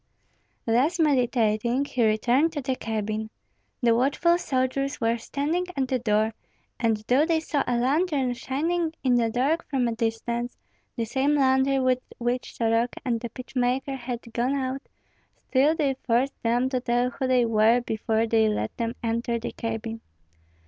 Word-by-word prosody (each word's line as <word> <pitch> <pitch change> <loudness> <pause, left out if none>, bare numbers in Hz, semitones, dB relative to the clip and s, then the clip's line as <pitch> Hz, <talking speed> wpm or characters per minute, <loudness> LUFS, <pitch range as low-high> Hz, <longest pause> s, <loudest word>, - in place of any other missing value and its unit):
Thus 265 +10 +2
meditating, 245 -3 +2
he 255 -4 -1
returned 245 +9 +2
to 290 - -3
the 260 0 -1
cabin. 220 -1 -3 0.5
The 235 -1 +5
watchful 300 +8 +2
soldiers 275 0 -1
were 230 -1 +1
standing 305 +9 -2
at 265 -2 0
the 255 - +1
door, 220 -1 +1 0.5
and 225 -2 +2
though 260 +4 +4
they 325 0 +2
saw 300 -3 -1
a 245 - +1
lantern 275 0 +1
shining 320 +7 -1
in 255 -2 +3
the 235 -2 +3
dark 275 +8 +1
from 260 -4 +1
a - - 0
distance, 235 +2 -2 0.4
the 230 - -1
same 270 +6 +1
lantern 265 -1 +3
with 255 -1 +2 0.2
which 245 +1 -2
Soroka 230 +1 0
and 235 -3 0
the 235 - -5
pitch 255 +3 -11
maker 255 +2 0
had 245 -2 -5
gone 250 +4 0
out, 265 0 -2 0.7
still 285 +4 +3
they 285 -4 +1
forced 245 +3 0
them 240 +2 +1
to 255 -1 0
tell 245 0 +1
who 260 - -3
they 250 -2 +3
were 225 +1 +4
before 220 -1 0
they 220 -1 +3
let 110 - -2
them 230 +1 -2
enter 235 +1 -1
the 230 - -5
cabin. 225 0 -4
245 Hz, 165 wpm, -26 LUFS, 230-275 Hz, 0.7 s, The